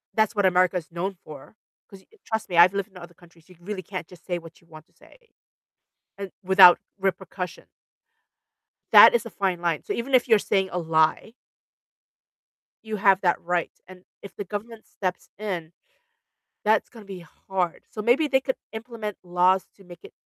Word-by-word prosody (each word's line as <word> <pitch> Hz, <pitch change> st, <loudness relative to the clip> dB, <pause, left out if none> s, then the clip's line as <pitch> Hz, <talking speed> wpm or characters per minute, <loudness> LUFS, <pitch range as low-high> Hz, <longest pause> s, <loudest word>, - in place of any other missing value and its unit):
That's 220 Hz, 0 st, +1 dB
what 205 Hz, -2 st, +1 dB
America's 180 Hz, -2 st, +2 dB
known 185 Hz, +3 st, -4 dB
for, 150 Hz, +6 st, -13 dB, 0.3 s
'cause 195 Hz, -1 st, -14 dB
you 445 Hz, -, -24 dB
trust 220 Hz, -2 st, -3 dB
me, 175 Hz, -, -2 dB
I've 175 Hz, +2 st, +7 dB
lived 200 Hz, +1 st, -3 dB
in 185 Hz, -, -15 dB
other 175 Hz, -1 st, -12 dB
countries, 170 Hz, -1 st, -22 dB
you 180 Hz, -, -16 dB
can 175 Hz, +1 st, -23 dB
really 205 Hz, -1 st, -5 dB
can't 185 Hz, -2 st, -7 dB
just 180 Hz, -1 st, -17 dB
say 175 Hz, -2 st, -2 dB
what 165 Hz, -1 st, -15 dB
you 170 Hz, -, -27 dB
want 155 Hz, -1 st, -14 dB
to -, -, -37 dB
say, -, -, -21 dB, 1.0 s
uh, 200 Hz, -, -5 dB, 0.2 s
without 185 Hz, -1 st, +7 dB, 0.2 s
repercussion 190 Hz, -1 st, -4 dB, 1.3 s
that -, -, +9 dB
is -, -, 0 dB
a -, -, -7 dB
fine 185 Hz, -3 st, -2 dB
line, 170 Hz, -3 st, -1 dB
so -, -, -4 dB
even 245 Hz, +4 st, -5 dB
if 255 Hz, 0 st, +4 dB
you're 225 Hz, -3 st, +5 dB
saying 190 Hz, -1 st, 0 dB
a 180 Hz, -, -4 dB
lie 160 Hz, +5 st, +1 dB, 1.5 s
you 220 Hz, -1 st, -5 dB
have 195 Hz, -2 st, +3 dB
that 175 Hz, -2 st, +1 dB
right, 175 Hz, 0 st, -2 dB, 0.2 s
and 185 Hz, 0 st, -15 dB, 0.2 s
if 200 Hz, -, -11 dB
the -, -, -5 dB
government 215 Hz, +3 st, -8 dB
steps 185 Hz, -2 st, -5 dB
in, 180 Hz, -6 st, -5 dB, 0.9 s
that's 215 Hz, 0 st, +2 dB
gonna 225 Hz, -3 st, -14 dB
be 190 Hz, -3 st, -10 dB, 0.2 s
hard, 185 Hz, -3 st, -2 dB
so 215 Hz, -, -6 dB
maybe 245 Hz, +8 st, +2 dB
they 265 Hz, -1 st, +2 dB
could 260 Hz, 0 st, -3 dB, 0.2 s
implement 220 Hz, -2 st, -7 dB
laws 180 Hz, +1 st, +2 dB
to 195 Hz, -, -19 dB
make 175 Hz, -1 st, -14 dB
it -, -, -13 dB
190 Hz, 185 wpm, -24 LUFS, 175-210 Hz, 1.5 s, that